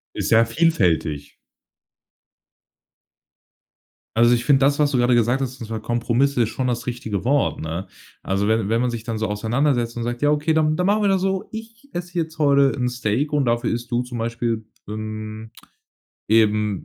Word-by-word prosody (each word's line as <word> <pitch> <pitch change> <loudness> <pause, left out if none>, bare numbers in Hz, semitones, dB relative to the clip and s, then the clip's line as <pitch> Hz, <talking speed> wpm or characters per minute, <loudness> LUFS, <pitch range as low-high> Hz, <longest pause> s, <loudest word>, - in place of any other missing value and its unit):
Ist - - -2
ja 115 +1 +6
vielfältig. 90 - 0 2.8
Also 120 +1 +5
ich 120 0 0
finde 140 -2 +5
das, 140 +2 +2
was 145 -1 +3
du 130 - +1
gerade 120 0 +3
gesagt 120 +3 +2
hast, 130 -1 -4
und 115 - -7
zwar 110 -1 -5
Kompromisse, 120 +3 +1
ist 110 - -2
schon 130 +1 -2
das 120 0 -2
richtige 115 -5 -4
Wort, 140 +2 +1
ne? 80 +4 -4 0.4
Also 100 +1 0
wenn 110 -2 +1
wenn 115 +1 +2
man 125 - +1
sich 115 -2 -5
dann 115 -2 -3
so 110 - -1
auseinandersetzt 120 +3 0
und 120 - -2
sagt: 120 +1 -4
„Ja 145 0 +3
okay, 150 +2 +1
dann, 155 -1 +2
dann 180 - 0
machen 210 +1 +2
wir 200 - +3
da 195 - +3
so. 190 0 -2
Ich 225 +4 -10
esse 175 0 -5
jetzt 160 -1 -4
heute 140 -2 +4
'n 125 -1 0
Steak 125 +4 -1
und 145 -2 +2
dafür 120 0 +1
isst 120 +1 -5
du 120 +1 +1
zum 125 -1 -7
Beispiel, 115 -1 -2 0.2
ähm, 110 +1 -6 0.8
eben 105 -2 +2
120 Hz, 190 wpm, -22 LUFS, 110-145 Hz, 2.8 s, ja